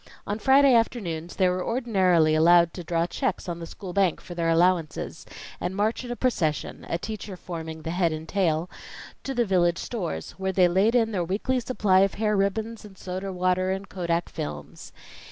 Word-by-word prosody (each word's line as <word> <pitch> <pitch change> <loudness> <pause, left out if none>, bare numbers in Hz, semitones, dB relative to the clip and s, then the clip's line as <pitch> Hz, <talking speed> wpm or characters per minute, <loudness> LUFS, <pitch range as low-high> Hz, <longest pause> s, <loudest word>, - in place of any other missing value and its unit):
On 205 +2 -3
Friday 270 +3 +5
afternoons, 180 -8 0
they 185 - +3
were 180 0 0
ordinarily 190 -10 +2
allowed 170 +2 +5
to 180 - -7
draw 165 0 0
checks 175 - -2
on 170 -1 -4
the 165 - -7
school 185 0 -8
bank 190 -4 +2
for 175 - -10
their 170 -1 -1
allowances, 165 -1 +1 0.3
and 180 +2 -3
march 215 +5 0
in 245 - -8
a 245 - -3
procession 175 - -1
a 165 - 0
teacher 205 0 -6
forming 160 -3 -7
the 165 - -3
head 175 -1 +1
and 155 +1 -6
tail 170 -4 0 0.6
to 270 - -4
the 240 -1 +2
village 175 -3 +2
stores, 175 - -4
where 190 0 -1
they 185 -1 +4
laid 195 +7 +2
in 225 -2 +3
their 185 -4 -1
weekly 210 +9 -1
supply 215 -6 +2
of 195 0 +2
hair 210 0 +1
ribbons 215 +3 -1
and 200 -3 -13
soda 185 +2 -5
water 185 0 +1
and 195 +1 -3
kodak 170 -2 -1
films. 75 -1 -7
185 Hz, 190 wpm, -26 LUFS, 170-210 Hz, 0.6 s, Friday